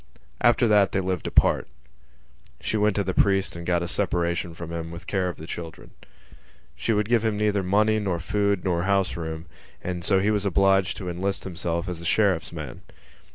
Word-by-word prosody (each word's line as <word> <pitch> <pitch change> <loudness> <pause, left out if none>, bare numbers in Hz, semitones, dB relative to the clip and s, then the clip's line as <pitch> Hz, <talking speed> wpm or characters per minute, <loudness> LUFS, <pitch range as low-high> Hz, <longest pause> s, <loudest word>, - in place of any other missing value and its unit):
After 120 0 +4
that 105 -2 +4
they 95 - +2
lived 95 -1 -2
apart. - - +3 0.9
She - - -2
went 105 -1 +2
to 100 - +1
the 95 -1 -2
priest 95 -1 +2
and 85 0 -7
got 85 -1 +2
a - - -3
separation 85 0 -1
from 85 0 -7
him 85 -1 -4
with 85 0 -9
care 95 -3 0
of 90 - -7
the 80 - -8
children. 80 -1 -8 0.8
She - - -1
would 105 -1 +1
give 115 -1 +2
him 110 -2 0
neither 105 -1 +1
money 105 +4 +2
nor 95 -5 -1
food 100 +2 0
nor 85 -3 +1
house 100 -1 +1
room; 80 -1 -5 0.4
and 90 -1 -4
so 95 +2 +3
he 100 +3 +2
was 105 -2 0
obliged 95 -1 +2
to 95 - -6
enlist 95 +3 -2
himself 85 -2 -3
as 90 -2 -5
a - - -8
sheriff's 95 -3 +2
man. - - -7
95 Hz, 200 wpm, -25 LUFS, 85-105 Hz, 0.9 s, After